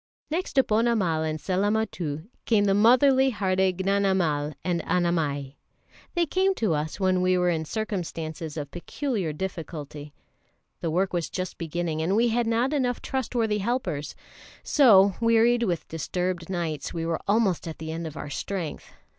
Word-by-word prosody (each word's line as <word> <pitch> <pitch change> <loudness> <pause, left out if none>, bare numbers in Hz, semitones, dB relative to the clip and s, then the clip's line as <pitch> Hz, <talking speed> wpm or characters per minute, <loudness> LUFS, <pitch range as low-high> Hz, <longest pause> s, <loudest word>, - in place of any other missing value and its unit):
Next 350 +4 -2
to 265 - +5
Ponnamal 215 -8 +1
and 155 0 -2
Sellamuttu 185 -6 -1 0.2
come 210 -3 +4
the 195 - +3
motherly 260 +5 +5
hearted 190 -4 +1
Gnanamal 190 -7 +1
and 175 -2 0
Annamai. 160 -6 -1 0.6
They 345 -1 +3
came 380 +4 +1
to 215 - +1
us 155 +4 -3
when 185 -1 +2
we 185 0 +3
were 180 0 +2
in 160 -1 -1
circumstances 165 -6 -4
of 145 -2 -5
peculiar 195 - -3
difficulty. 150 -4 -6 0.6
The 165 - -2
work 185 +4 0
was 170 -2 -1
just 185 -1 -5
beginning, 165 -1 -2
and 180 +5 +1
we 235 +2 +3
had 235 0 +1
not 235 +5 +1
enough 250 -4 0
trustworthy 230 -5 -1
helpers; 200 - -2 0.5
so, 200 -9 +6
wearied 230 +1 +4
with 180 -8 -1
disturbed 175 +2 -3
nights, 165 -5 -3
we 165 -1 -2
were 165 -1 -1
almost 200 -5 +2
at 160 - -6
the 160 0 -6
end 165 0 -4
of 155 - -9
our 145 - -6
strength. 175 +2 -4
185 Hz, 155 wpm, -26 LUFS, 160-225 Hz, 0.6 s, so